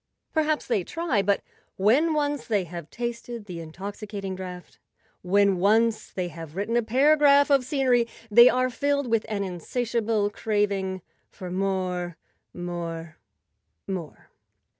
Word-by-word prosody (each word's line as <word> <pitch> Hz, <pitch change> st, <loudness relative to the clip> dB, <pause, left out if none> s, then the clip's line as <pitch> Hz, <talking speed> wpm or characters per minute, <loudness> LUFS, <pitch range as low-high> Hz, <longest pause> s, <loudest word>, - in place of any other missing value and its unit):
Perhaps 310 Hz, -1 st, +1 dB
they 220 Hz, -7 st, 0 dB
try; 305 Hz, -, 0 dB
but 200 Hz, +1 st, +1 dB, 0.3 s
when 275 Hz, +12 st, +3 dB
once 290 Hz, -2 st, -1 dB
they 205 Hz, -4 st, +1 dB
have 170 Hz, -2 st, -8 dB
tasted 235 Hz, -1 st, -5 dB
the 180 Hz, -4 st, -7 dB
intoxicating 195 Hz, +4 st, -6 dB
draught, 180 Hz, -1 st, -9 dB, 0.4 s
when 200 Hz, +1 st, +3 dB
once 220 Hz, +3 st, +2 dB
they 180 Hz, -2 st, -3 dB
have 165 Hz, -1 st, -9 dB
written 205 Hz, +4 st, -1 dB
a 240 Hz, -, +4 dB
paragraph 285 Hz, +4 st, +4 dB
of 275 Hz, -2 st, +5 dB
scenery, 255 Hz, -3 st, +2 dB, 0.2 s
they 235 Hz, +3 st, +9 dB
are 255 Hz, 0 st, +1 dB
filled 285 Hz, +3 st, 0 dB
with 230 Hz, -2 st, 0 dB
an 205 Hz, -2 st, -1 dB
insatiable 215 Hz, +3 st, -1 dB
craving 200 Hz, -4 st, -1 dB, 0.3 s
for 185 Hz, -3 st, -8 dB
more—more—more. 175 Hz, -3 st, -4 dB
205 Hz, 120 wpm, -26 LUFS, 185-245 Hz, 0.4 s, they